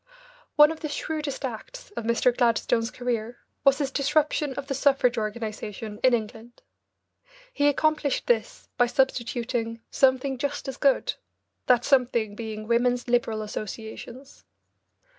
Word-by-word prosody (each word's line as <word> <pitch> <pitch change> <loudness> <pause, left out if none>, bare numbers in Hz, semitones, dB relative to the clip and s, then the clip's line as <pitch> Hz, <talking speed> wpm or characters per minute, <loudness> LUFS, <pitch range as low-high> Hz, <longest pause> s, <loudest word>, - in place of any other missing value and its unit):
One 300 +1 +7
of 320 - -7
the 305 - -4
shrewdest 295 -2 -3
acts 265 - -8
of 235 - -6
Mr. 235 +1 +2
Gladstone's 230 -1 +2
career 240 -2 -3 0.3
was 275 -1 +5
his 280 -2 -2
disruption 290 0 +1
of 280 - -5
the 275 - -3
suffrage 270 -2 +3
organisation 215 -1 -5
in 255 -2 +5
England. 225 +1 -7 0.9
He 290 0 +2
accomplished 300 -1 +1
this 225 -3 -1
by 245 - +4
substituting 235 -2 -1
"something 265 0 +2
just 285 +1 -3
as 265 0 -5
good," 275 -2 +2 0.5
that 245 -2 +4
something 240 -6 +2
being 215 -1 -6
Women's 245 +1 +1
Liberal 230 -3 +1
Associations. 220 +5 -8
245 Hz, 130 wpm, -26 LUFS, 230-275 Hz, 0.9 s, One